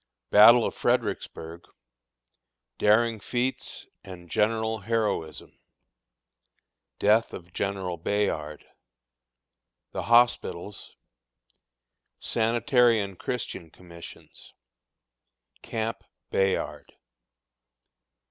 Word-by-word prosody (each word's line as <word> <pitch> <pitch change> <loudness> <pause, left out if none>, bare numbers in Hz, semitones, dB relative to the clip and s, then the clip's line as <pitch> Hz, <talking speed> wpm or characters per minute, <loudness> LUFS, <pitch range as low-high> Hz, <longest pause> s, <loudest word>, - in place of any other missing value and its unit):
Battle 115 +3 +8
of - - -2
Fredericksburg 80 +1 -2 1.1
Daring 110 +2 +3
Feats 125 +5 -3 0.2
and 90 -3 -12
General 110 +1 0
Heroism. 105 -7 -3 1.4
Death 110 +2 +2
of 85 0 -10
General 95 -3 -3
Bayard. 80 -5 -2 1.3
The - - -4
Hospitals. 115 -5 +1 1.2
Sanitary 120 +1 +2
and 100 -3 -5
Christian 110 -8 -5
Commissions. 85 0 -13 1.1
Camp 115 0 -4 0.3
"Bayard." 95 -1 -1
105 Hz, 65 wpm, -26 LUFS, 90-115 Hz, 1.4 s, Battle